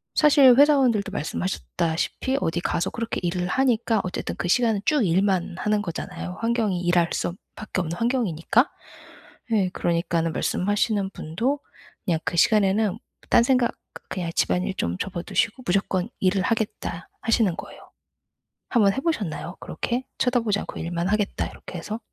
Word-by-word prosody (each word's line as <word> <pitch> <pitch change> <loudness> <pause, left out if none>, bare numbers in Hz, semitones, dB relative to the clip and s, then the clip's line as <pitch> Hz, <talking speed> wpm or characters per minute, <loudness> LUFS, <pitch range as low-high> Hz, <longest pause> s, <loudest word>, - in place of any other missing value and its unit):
사실 280 -4 +7
회사원들도 260 -8 +4
말씀하셨다시피 180 - -2
어디 170 +1 0
가서 170 - 0
그렇게 230 0 -3
일을 180 +1 -1
하니까 235 -2 +2
어쨌든 185 - -4
그 - - -2
시간은 225 +1 +3
쭉 295 -8 +3
일만 185 0 +1
하는 210 +1 +1
거잖아요. 180 0 -5
환경이 230 -5 +1
일할 175 -1 +3
수 - - -1
없 175 - -8 0.2
밖에 215 -3 -4
없는 170 0 -4
환경이니까. 230 - +1 0.8
예. 200 -5 +2
그러니까는 170 -2 0
말씀하시는 205 0 0
분도 230 - -2 0.5
그냥 165 -3 +1
그 170 - -2
시간에는 205 +1 +3 0.3
딴 235 - +6
생각 250 -2 +2 0.2
그 - - -12
그냥 175 -3 -3
집안일 180 +1 +1
좀 85 - -2
접어 185 -2 -3
두시고 225 +3 0
'무조건 190 +1 0
일을 190 0 +2
하겠다.' 210 -5 -2
하시는 225 -6 +2
거예요. - - -9 0.9
한번 205 -5 +4
해 - - -2
보셨나요? 205 - -2
그렇게? 250 +2 -3
'쳐다보지 235 -5 +2
않고 - - -6
일만 170 +1 -2
하겠다.' 210 0 0
이렇게 - - -10
해서? 215 +2 -5
200 Hz, 360 characters per minute, -24 LUFS, 175-230 Hz, 0.9 s, 사실